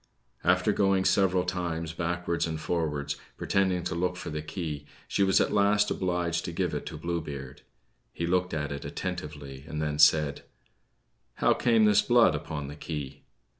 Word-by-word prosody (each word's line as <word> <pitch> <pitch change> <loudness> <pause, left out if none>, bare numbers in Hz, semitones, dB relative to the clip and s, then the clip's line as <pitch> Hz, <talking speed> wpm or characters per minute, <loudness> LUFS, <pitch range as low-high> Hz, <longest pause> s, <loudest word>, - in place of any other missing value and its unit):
After - - +3
going 95 -1 +2
several 95 -2 +3
times 85 -3 -3
backwards 85 0 -1
and 80 -1 -3
forwards, 75 -3 -2 0.2
pretending 95 -2 +1
to - - -2
look 90 +1 -1
for - - -6
the 75 0 -3
key, 75 -2 -5 0.2
she - - -1
was 95 -1 +4
at - - +1
last 105 0 +3
obliged 90 -2 -1
to - - -3
give 85 - -1
it - - -4
to - - -6
Blue 85 0 -2
Beard. 70 -3 -8 0.5
He 85 - -3
looked 90 +1 +1
at 75 -2 -2
it 70 - -5
attentively, 75 -6 -6
and 75 -1 -4
then 75 -1 -2
said: 75 -1 +5 0.9
"How - - +3
came 115 -3 +3
this 105 -1 +5
blood 120 -6 +5
upon 75 -1 -4
the 70 - -8
key?" 70 -3 -6
85 Hz, 170 wpm, -28 LUFS, 75-90 Hz, 0.9 s, said